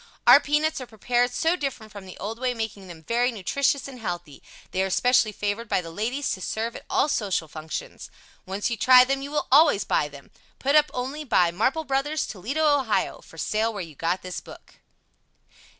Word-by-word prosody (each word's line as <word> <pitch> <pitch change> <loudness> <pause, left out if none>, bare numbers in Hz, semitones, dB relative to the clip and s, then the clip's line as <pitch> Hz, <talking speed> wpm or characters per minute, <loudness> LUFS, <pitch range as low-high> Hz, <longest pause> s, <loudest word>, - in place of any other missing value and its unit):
Our - - +9
peanuts 300 0 0
are 255 - -7
prepared 240 +2 0
so 325 +7 +1
different 270 -9 -5
from 200 -2 -10
the 185 - -10
old 220 +4 -5
way, 250 -1 -1
making 215 -4 -5
them 165 -2 -11
very 240 +6 +1
nutritious 270 +7 0
and 260 -2 -10
healthy. 175 -8 -6 0.3
They 185 - 0
are 190 - +1
especially 245 +3 +3
favored 210 +2 -3
by - - +1
the 165 -1 -9
ladies 240 +10 -2
to 185 - -4
serve 225 +5 -3
at - - -10
all - - +2
social 200 - -1
functions. 155 +1 -7 0.3
Once 195 +5 -3
you 235 - -2
try 255 +3 +7
them, 270 +1 -1
you 280 - -6
will 295 0 -1
always 285 -7 +6
buy 145 - +1
them. 140 -1 -14 0.3
Put 280 +2 +1
up 300 -1 +5
only 270 +5 -4
by 180 - +3
MARPLE 255 - 0
BROS., 295 +2 -1
Toledo. 245 - -3
O. 275 -7 +1
For 165 - -16
Sale 215 +6 0
where 200 -4 -5
you 165 -2 -11
got 170 +5 -2
this 185 -1 -5
book. - - -15
230 Hz, 200 wpm, -25 LUFS, 190-275 Hz, 0.3 s, Our